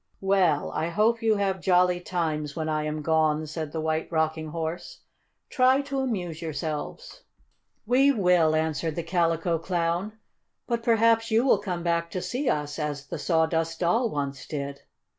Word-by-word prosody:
"Well, 190 -6 +2
I 160 - -1
hope 220 +6 +2
you 220 -1 +3
have 195 -2 -1
jolly 180 +1 +3
times 155 -5 -2
when 160 -1 -3
I 155 -1 -1
am 150 0 -3
gone," 155 -1 +2
said 155 0 -5
the 160 - -4
White 160 +1 -2
Rocking 160 -1 0
Horse. 165 +2 -5 0.5
"Try 260 +1 +3
to 275 -1 -3
amuse 185 -11 -3
yourselves." 160 - -5 0.6
"We 260 +5 +4
will," 180 - +3
answered 160 0 -1
the 170 - -3
Calico 165 -1 0
Clown. 175 +3 -1 0.5
"But 235 -1 -1
perhaps 230 0 +3
you 225 +3 +3
will 250 - +4
come 180 -4 -4
back 170 -1 0
to 180 +2 -4
see 255 +3 -1
us, 150 0 -2
as 145 -2 -3
the - - -4
Sawdust 165 -1 0
Doll 225 +8 +2
once 140 -5 -4
did." 140 -2 -5
170 Hz, 160 wpm, -26 LUFS, 155-200 Hz, 0.6 s, We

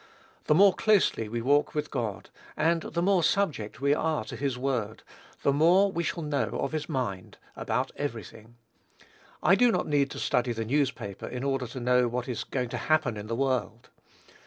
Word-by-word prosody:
The 150 - +3
more 195 +2 +6
closely 200 - +2
we 115 +1 -3
walk 145 +4 +2
with 150 - -2
God, 115 -7 -4 0.3
and 165 +2 +2
the 170 +2 -3
more 190 -1 +3
subject 155 - 0
we 140 +1 +3
are 155 -3 0
to - - -7
his 135 -2 -2
word, 125 -5 -2 0.4
the 140 - +3
more 180 +7 +4
we 170 - -2
shall 170 0 -3
know 140 -7 -1
of 140 - -2
his 155 0 -4
mind 120 - -4 0.2
about 125 +4 -2
every 120 -7 -3
thing. 115 +2 -15 0.9
I 175 - +5
do 245 +4 +5
not - - 0
need 145 -2 +1
to - - -8
study 125 -1 0
the 115 0 -4
newspaper 125 -6 -2
in 125 +1 -5
order 135 -2 -1
to 130 - -7
know 125 0 +3
what 120 +1 -3
is 125 -3 -3
going 125 -3 -3
to - - -4
happen 155 -7 +1
in 105 0 -7
the 115 - -2
world. 120 -3 -2
135 Hz, 195 wpm, -28 LUFS, 120-155 Hz, 0.9 s, more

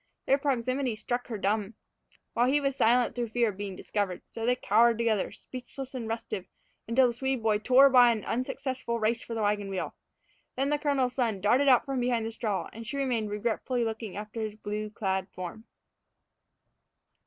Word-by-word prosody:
Their 275 +2 +3
proximity 255 -2 0
struck 245 +3 -3
her 225 - -4
dumb, 205 +2 -1 0.6
while 240 +1 +3
he 285 +3 +3
was 275 -2 -1
silent 240 0 +3
through 240 0 -2
fear 235 0 +1
of 195 - -7
being 200 -2 -5
discovered. 195 -2 -3
So 225 0 -4
they 250 - +4
cowered 230 0 +4
together, 225 -4 +1
speechless 255 +4 -8
and 240 -4 -4
restive, 225 -5 -4 0.4
until 245 +3 +4
the 240 - +1
Swede 265 -1 -2
boy 215 -2 +2
tore 255 +5 +6
by 250 -3 +7
in 230 - 0
an - - -11
unsuccessful 255 -1 -2
race 225 +2 +1
for 230 - -6
the 220 - -1
wagon 205 -1 0
wheel. 190 -1 -3 0.6
Then 270 +2 0
the 295 - +1
colonel's 275 -4 +1
son 230 -6 0
darted 245 +8 +3
out 255 -3 +6
from 270 -2 -2
behind 240 -2 +1
the 225 - -3
straw, 220 -4 -2
and 230 - -8
she 265 +5 -5
remained 245 -6 0
regretfully 235 +3 -1
looking 220 -3 -4
after 210 +2 -5
his 215 -1 -3
blue 210 0 -4
clad 190 -3 -2
form. 185 +5 -7
230 Hz, 190 wpm, -29 LUFS, 215-255 Hz, 0.6 s, by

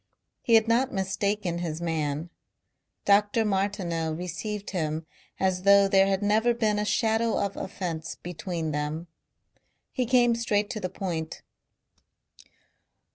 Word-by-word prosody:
He 230 - +4
had 220 0 +5
not 245 +3 +2
mistaken 190 -1 -1
his 165 -2 -3
man. 160 -1 -2 0.7
Dr. 205 +2 +3
Martineau 190 -5 -1
received 180 +5 -5
him 160 -3 -2 0.3
as 185 -1 +1
though 200 +1 +6
there 195 0 +4
had 195 +1 0
never 220 +3 +3
been 215 -3 +1
a 210 - 0
shadow 225 +1 +1
of 200 -1 -1
offence 165 -4 -5
between 170 -2 -4
them. 150 +3 -3 0.9
He 255 -3 -1
came 240 -1 +4
straight 210 -2 0
to 220 - -4
the 185 - -3
point. 170 -4 -4
195 Hz, 130 wpm, -27 LUFS, 170-210 Hz, 0.9 s, though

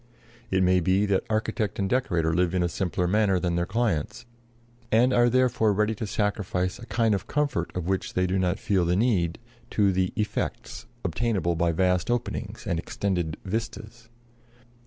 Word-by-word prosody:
It 95 0 +2
may 90 0 +4
be 95 +3 +2
that 100 -2 +1
architect 110 -1 -1
and 100 - 0
decorator 90 -10 +1
live 90 +1 +1
in 90 - +2
a - - +2
simpler 90 0 -1
manner 100 -1 +2
than 90 -1 -1
their 85 0 0
clients, 105 -9 -1 0.7
and 125 +4 +4
are 120 0 +4
therefore 125 -4 +2
ready 105 +2 +1
to 110 0 -5
sacrifice 100 -3 -1
a 120 - -10
kind 115 -2 +2
of 100 - -2
comfort 145 - -1
of 90 -2 -3
which 95 +1 -2
they 90 - +2
do 95 +1 0
not 90 0 +1
feel 95 -3 +1
the 85 +1 +1
need 95 -6 +1 0.3
to 100 -2 +2
the 95 0 0
"effects" 105 +1 -3 0.2
obtainable 90 -1 0
by 85 0 +1
vast 90 +3 +1
openings 120 -3 -3
and 85 -5 -1
extended 85 -3 -2
"vistas." 110 +2 -5
95 Hz, 175 wpm, -26 LUFS, 90-110 Hz, 0.7 s, may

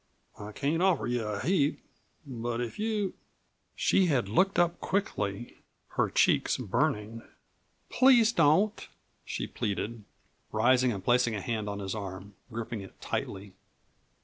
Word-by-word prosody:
I 105 +1 -7
can't 145 +9 -1
offer 185 -5 +2
you 120 -1 -1
a 105 -1 -3
heap, 150 - +1 0.5
but 120 -3 -4
if 120 - -4
you 215 -3 -1 0.3
" - - -44 0.3
She 190 -2 +3
had 130 - +1
looked 190 - +2
up 175 0 +2
quickly, 120 - -2 0.3
her - - 0
cheeks - - +2
burning. 110 +2 -1 0.7
"Please 245 -3 +6
don't," 170 +3 +2 0.4
she - - -4
pleaded, 105 +2 -3 0.5
rising 125 +3 +3
and 100 -4 -5
placing 120 -2 +3
a - - -2
hand 110 0 -3
on 100 - -4
his 95 -2 -4
arm, 100 -1 -7 0.2
gripping 115 -1 -5
it 95 - -13
tightly. 95 0 -4
120 Hz, 140 wpm, -29 LUFS, 105-170 Hz, 0.7 s, Please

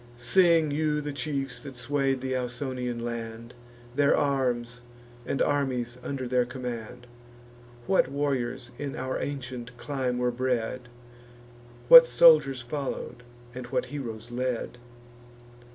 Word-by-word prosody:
Sing 165 +4 +4
you 150 0 0
the 145 -1 -4
chiefs 140 -3 -3
that 135 -3 -9
sway'd 135 +1 0
th' 130 0 -2
Ausonian 125 -1 -3
land, 115 0 -6 0.4
Their 145 0 +3
arms, 125 -4 0 0.5
and 135 - +1
armies 125 -4 -1
under 130 -1 -4
their 125 0 +2
command; 125 -1 -7 0.8
What 190 -4 +3
warriors 130 -3 -2
in 140 -2 -4
our 130 0 -3
ancient 125 -3 -6
clime 130 -2 -2
were 125 0 +1
bred; 125 -1 -2 1.0
What - - +11
soldiers 470 - +5
follow'd, 130 -1 -5 0.3
and 125 -1 -7
what 125 0 -1
heroes 120 -5 -6
led. 120 -1 -3
130 Hz, 120 wpm, -27 LUFS, 120-140 Hz, 1.0 s, What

